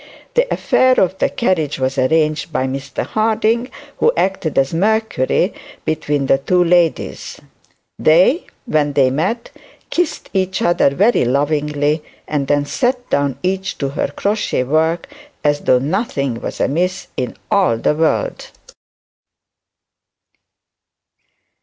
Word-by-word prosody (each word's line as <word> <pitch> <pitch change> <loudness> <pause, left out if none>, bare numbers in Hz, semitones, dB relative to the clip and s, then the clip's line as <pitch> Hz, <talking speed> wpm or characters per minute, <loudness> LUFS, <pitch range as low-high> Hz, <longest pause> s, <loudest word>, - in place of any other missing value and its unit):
The - - +1
affair 255 0 +3
of 190 +1 +1
the - - +2
carriage 165 - 0
was 130 +1 -1
arranged 155 +4 +1
by 130 -4 0
Mr 135 0 -4
Harding, 225 +3 0 0.3
who 470 - +4
acted 190 -5 -1
as 135 +2 +2
Mercury 205 - +1 0.3
between 150 -3 -1
the 135 - +3
two 180 +6 +2
ladies; 170 -1 0 0.6
they, 180 - +4 0.2
when 150 - +1
they 135 -2 +3
met, 185 - -2 0.4
kissed 350 -2 -2
each 190 -1 0
other 175 -4 +3
very 200 +12 +2
lovingly, 145 +3 0 0.3
and 145 -3 -1
then 145 0 +1
sat 245 - -1
down 140 -3 +1
each 190 +1 -2
to 140 - -2
her 140 - -1
crochet 200 0 -1
work 160 - 0 0.4
as 145 0 +2
though 125 - +3
nothing 140 - -2
was - - -5
amiss 180 +6 -1
in 125 - -4
all 185 - +3
the 115 - +1
world. 165 - -1
160 Hz, 125 wpm, -18 LUFS, 140-195 Hz, 0.6 s, who